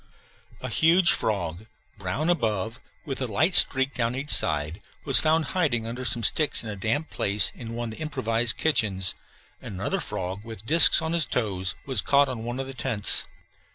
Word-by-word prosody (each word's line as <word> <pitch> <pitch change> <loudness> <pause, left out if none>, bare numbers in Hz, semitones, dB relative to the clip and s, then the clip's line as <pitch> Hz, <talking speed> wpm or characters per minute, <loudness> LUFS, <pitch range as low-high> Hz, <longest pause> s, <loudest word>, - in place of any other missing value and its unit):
A - - -5
huge 170 +3 +3
frog, 100 -1 -3 0.3
brown 100 - -4
above, 110 - -3 0.3
with 135 -3 -6
a 130 - -2
light 150 - 0
streak 135 -2 +4
down 120 0 -2
each 140 +3 -4
side, 75 +2 +2 0.2
was - - +8
found 160 0 +1
hiding 140 -12 -1
under 120 +3 -7
some 120 -1 0
sticks 150 +6 +2
in 110 - -7
a - - -7
damp 115 +11 -3
place 100 0 +1
in 115 -2 -9
one 120 -1 -5
of - - -12
the - - -11
improvised 120 -6 -2
kitchens; 95 - -1 0.5
and - - -9
another 95 - -3
frog, 95 +3 -6
with 110 -2 -11
disks 165 +3 +6
on 160 +1 -3
his 165 -5 +1
toes, 95 -7 -3
was 130 -7 0
caught 140 0 +2
on 120 -3 -6
one 120 +2 -6
of 135 - -4
the 135 - -9
tents. 115 -4 +3
115 Hz, 190 wpm, -24 LUFS, 105-140 Hz, 0.5 s, was